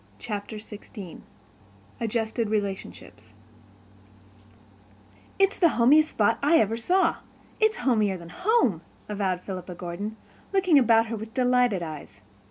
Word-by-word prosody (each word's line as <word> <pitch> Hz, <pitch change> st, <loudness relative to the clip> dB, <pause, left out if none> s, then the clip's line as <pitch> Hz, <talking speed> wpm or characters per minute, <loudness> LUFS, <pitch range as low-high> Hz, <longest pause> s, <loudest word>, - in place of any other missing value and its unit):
Chapter 205 Hz, -, -6 dB
XVI 210 Hz, -4 st, -10 dB, 0.8 s
Adjusted 225 Hz, -1 st, -1 dB
Relationships 190 Hz, -, -5 dB, 2.0 s
"It's 390 Hz, 0 st, +2 dB
the 340 Hz, -4 st, +4 dB
homiest 300 Hz, +6 st, +5 dB
spot 220 Hz, +1 st, +1 dB
I 300 Hz, +4 st, +4 dB
ever 220 Hz, -3 st, +2 dB
saw—it's 375 Hz, -, 0 dB
homier 215 Hz, -, +1 dB
than 170 Hz, -1 st, -11 dB
home," 360 Hz, -, +1 dB, 0.3 s
avowed 195 Hz, -3 st, -2 dB
Philippa 185 Hz, -2 st, -7 dB
Gordon, 180 Hz, +5 st, -6 dB, 0.4 s
looking 370 Hz, -6 st, +5 dB
about 225 Hz, -2 st, +4 dB
her 230 Hz, 0 st, -4 dB
with 220 Hz, +1 st, -8 dB
delighted 250 Hz, -6 st, +2 dB
eyes. 150 Hz, -11 st, -9 dB
220 Hz, 110 wpm, -26 LUFS, 190-255 Hz, 2.0 s, homiest